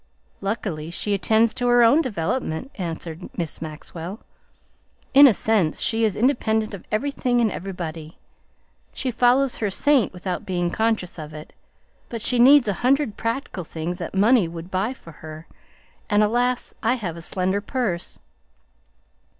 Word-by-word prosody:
"Luckily 195 -6 -3
she 205 +4 -2
attends 220 +3 +2
to 245 +1 -2
her 240 0 +5
own 240 +8 +5
development," 215 - -3
answered 170 - -6
Miss 165 -3 -4
Maxwell. 165 +5 -7 0.9
"In 280 +1 +10
a - - +6
sense 200 -9 +1
she 225 0 0
is 215 -4 +2
independent 220 -3 +1
of 195 - -8
everything 250 +1 0
and 225 -3 +2
everybody; 170 -4 -6 0.8
she 255 - -3
follows 250 +3 +3
her 210 - -1
saint 265 +3 +3
without 180 0 -4
being 175 -2 -1
conscious 220 -6 -1
of 155 0 -8
it. 155 0 -10 0.6
But 230 -2 -5
she 245 0 +2
needs 265 0 +7
a 205 - +1
hundred 265 -3 +2
practical 230 -4 -3
things 165 +3 -5
that 170 +2 -6
money 210 0 +4
would 165 +2 -9
buy 205 +8 -1
for 165 - -14
her, 155 +1 -10 0.6
and 210 -1 +4
alas! 245 +3 0
I 230 +2 +2
have 190 -9 -4
a 170 - -8
slender 190 +3 -1
purse." 205 -6 -3
210 Hz, 150 wpm, -23 LUFS, 175-245 Hz, 0.9 s, In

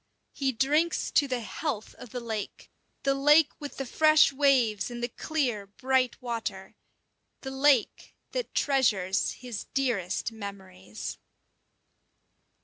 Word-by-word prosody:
He 270 -2 0
drinks 295 +8 +1
to 285 - +3
the 255 -2 -2
health 230 -1 -4
of 245 - -12
the 245 - -5
lake, 220 -4 -6 0.3
the 275 - +3
lake 295 +3 +5
with 290 -1 -8
the 270 - -3
fresh 310 +2 +5
waves 255 -8 +2
and 240 0 -6
the - - +1
clear, 245 -6 -2
bright 255 +4 0
water 215 -5 -4 0.7
the 265 - -6
lake 270 -3 +2 0.2
that - - -4
treasures 210 -10 +2
his 245 -5 -7
dearest 230 -7 0
memories. 190 - -8
250 Hz, 125 wpm, -28 LUFS, 210-275 Hz, 0.7 s, lake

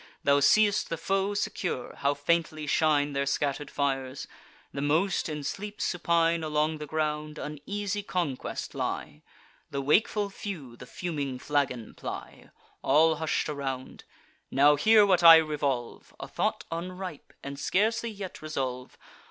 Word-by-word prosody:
Thou 140 0 +4
see'st 205 +8 +4
the 165 - -2
foe 195 +4 0
secure; 180 - -3
how 140 +1 +1
faintly 155 +1 0
shine 150 -1 +2
Their 140 0 -1
scatter'd 145 +1 -1
fires! 135 -1 -2 0.5
the 140 - -3
most, 160 +6 +1
in 150 -1 -4
sleep 205 +8 -5
supine 170 -1 +1
Along 155 0 0
the 150 - -6
ground, 150 0 -2
an 150 -1 -6
easy 205 0 -2
conquest 175 -9 -3
lie: - - -4 0.5
The 140 - -3
wakeful 200 +8 +2
few 160 - -7
the 125 +1 -12
fuming 145 -6 -4
flagon 125 -4 -1
ply; - - -8 0.3
All 155 +3 +4
hush'd 160 0 -1
around. 135 -3 -5 0.4
Now 145 +2 +5
hear 215 +7 +6
what 185 -3 +3
I 165 -1 +11
revolve— 145 -6 -1
A - - -6
thought - - -2
unripe—and 170 -5 -7
scarcely 225 +8 +1
yet 200 -4 -8
resolve. 130 -5 -4
155 Hz, 135 wpm, -28 LUFS, 140-180 Hz, 0.5 s, I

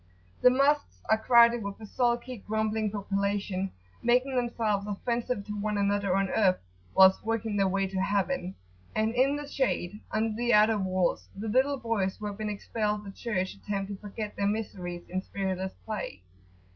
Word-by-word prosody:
The 250 - +8
Mosques 280 +3 +2
are 220 - +6
crowded 235 0 +6
with 200 0 -5
a 220 - -8
sulky, 240 +2 0
grumbling 215 +1 -1
population, 200 -1 -1 0.3
making 250 +3 +2
themselves 225 -4 0
offensive 235 +1 -2
to 210 - -5
one 210 0 -1
another 200 -1 +1
on 195 0 +2
earth 190 -3 +3 0.4
whilst 190 0 +7
working 225 -1 -1
their 195 -1 +3
way 195 +1 +1
to 190 0 -2
heaven; 200 +1 0 0.4
and 220 +1 +1
in 265 +3 +3
the 290 0 -5
shade, 210 -8 -1
under 220 0 0
the 240 0 +3
outer 215 0 +5
walls, 185 -2 0
the 210 +3 -5
little 265 +5 +2
boys 225 -6 -1
who 215 - -7
have 205 0 -5
been 215 -1 -2
expelled 210 0 -2
the 200 - -8
church 190 -4 -2
attempt 200 -1 -4
to 200 - -5
forget 210 0 -6
their 200 - 0
miseries 180 -5 -4
in 185 +1 -2
spiritless 190 -1 -3
play. 210 - -5
210 Hz, 170 wpm, -29 LUFS, 195-235 Hz, 0.4 s, The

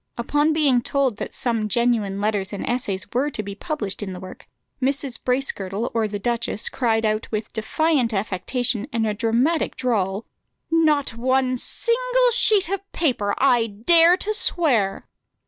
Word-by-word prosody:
Upon 295 +6 +1
being 290 -6 +3
told 265 -3 0
that - - -5
some 225 -3 -1
genuine 220 -4 0
letters 205 -2 -1
and 200 - -5
essays 210 -6 -1
were 265 +5 +1
to 215 -7 -5
be 200 0 -6
published 210 - -3
in 195 -2 -5
the 180 - -8
work, 185 0 -11 0.3
Mrs. 270 -1 -1
Bracegirdle 230 -5 -2
or 225 -2 +1
the 205 0 -4
duchess 235 0 -1
cried 225 -3 0
out 215 0 -1
with 215 -1 -4
defiant 255 +2 +1
affectation 220 +4 -1
and 225 -1 0
a 215 - 0
dramatic 235 +9 0
drawl, 205 -5 -1 0.5
"Not 305 -6 +2
one 255 +2 +1
single - - +2
sheet 430 -5 +3
of 395 +1 -5
paper, 235 -11 0
I 245 -4 +3
dare 330 - +4
to 430 +3 -1
swear." 275 - 0
240 Hz, 155 wpm, -22 LUFS, 210-290 Hz, 0.5 s, dare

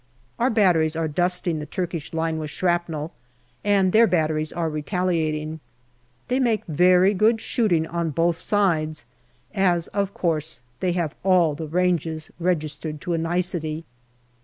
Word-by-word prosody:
Our 245 +2 +3
batteries 175 -8 +3
are 165 0 0
dusting 175 +1 0
the 150 - -6
Turkish 170 -2 -4
line 160 -1 -1
with 155 -1 -4
shrapnel, 170 -2 -1 0.5
and 195 -2 +3
their 225 +3 +6
batteries 155 -3 0
are 170 -1 -2
retaliating. 155 -1 -1 0.7
They 255 +1 +1
make 230 -5 +1
very 180 +4 +4
good 220 +3 +3
shooting 185 -10 +1
on 170 0 -2
both 165 +3 +1
sides, 160 - 0 0.5
as, 180 -4 +2
of 200 -1 -1
course, 160 -5 -2 0.2
they 180 -2 0
have 170 -3 -1
all 180 -5 +4
ranges 160 0 -1
registered 155 -3 -2
to 175 - -2
a 165 - 0
nicety. 165 -2 -2
170 Hz, 135 wpm, -23 LUFS, 155-185 Hz, 0.7 s, their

